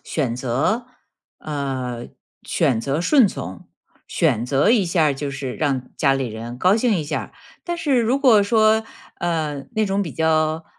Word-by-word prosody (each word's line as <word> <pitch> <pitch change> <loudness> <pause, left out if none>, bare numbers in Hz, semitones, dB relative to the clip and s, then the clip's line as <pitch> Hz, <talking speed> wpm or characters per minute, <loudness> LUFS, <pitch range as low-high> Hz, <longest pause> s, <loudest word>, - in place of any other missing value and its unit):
选 135 -7 -2
择 140 - -1 0.5
呃， 130 -5 -4 0.4
选 115 -4 +1
择 140 +5 -1
顺 255 - +5
从。 125 - -7 0.4
选 115 - +1
择 135 +3 +2
一 225 -5 +4
下 165 -3 +2
就 140 +1 -4
是 140 -2 -5
让 135 -4 -1
家 140 -2 +3
里 135 -1 -1
人 115 +2 -7
高 185 +8 +4
兴 230 -1 +2
一 165 - -1
下。 150 +1 -4 0.3
但 345 -1 -3
是 285 -6 +1
如 240 +4 +1
果 235 -7 +5
说， 220 +1 +3 0.3
呃， 155 -5 -2
那 215 -1 +1
种 195 +1 0
比 165 - -5
较， 160 0 +1
155 Hz, 170 characters per minute, -21 LUFS, 135-215 Hz, 0.5 s, 顺